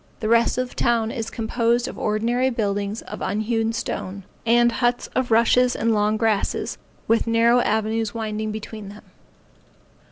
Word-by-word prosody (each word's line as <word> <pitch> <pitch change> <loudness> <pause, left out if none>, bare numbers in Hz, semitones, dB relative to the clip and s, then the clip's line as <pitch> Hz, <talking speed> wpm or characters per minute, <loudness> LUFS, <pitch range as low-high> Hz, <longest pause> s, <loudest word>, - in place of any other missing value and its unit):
The 215 - -2
rest 230 +2 +3
of 255 0 -1
the - - -14
town 230 -2 +1
is 230 -4 -4
composed 235 +1 0
of - - -7
ordinary 235 +4 0
buildings 205 -2 -2
of - - -8
unhewn 220 +3 0
stone, 200 -3 -4 0.2
and 240 +1 +5
huts 240 +1 0
of 260 -1 0
rushes 235 +2 +4
and 230 0 +1
long 210 0 +1
grass, 220 -2 0 0.3
with 230 +1 +2
narrow 230 +1 +4
avenues 220 -1 0
winding 215 -1 -3
between 215 -1 -7
them. 205 +1 -12
225 Hz, 155 wpm, -23 LUFS, 215-235 Hz, 0.3 s, and